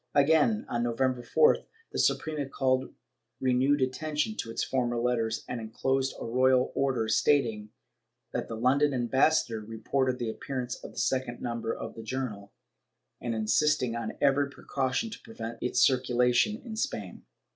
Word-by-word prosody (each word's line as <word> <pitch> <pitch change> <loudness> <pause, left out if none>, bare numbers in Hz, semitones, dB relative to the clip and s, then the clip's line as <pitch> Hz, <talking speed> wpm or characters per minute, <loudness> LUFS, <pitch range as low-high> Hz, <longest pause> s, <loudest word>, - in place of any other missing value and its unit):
Again, 140 -6 +4
on 120 - -1
November 125 +1 0
4th, 460 - +3 0.3
the - - -3
Suprema 150 -3 0
called 130 -1 0 0.5
renewed 130 +2 +2
attention 150 +9 -1
to 115 - -4
its 115 - -2
former 120 -2 0
letters 115 -2 0
and 120 -2 -4
enclosed 130 +4 -1
a - - -5
royal 130 +2 +3
order 130 -5 0
stating 110 -3 +2 0.6
that - - -3
the 115 - -5
London 135 +5 +2
ambassador 125 0 +2
reported 125 +4 -1
the 115 -2 -2
appearance 125 0 -4
of - - -8
the - - -17
second 130 -2 -1
number 115 -1 -3
of 115 - -5
the 115 - -8
journal, 110 -4 -4 0.7
and 120 -1 -2
insisting 120 +3 +2
on 115 -2 -3
every 140 0 +3
precaution 140 - -2
to - - -9
prevent 115 - -7
its 125 0 +1
circulation 125 - +2
in 225 -2 -6
Spain. 105 - -3
125 Hz, 150 wpm, -29 LUFS, 115-135 Hz, 0.7 s, Again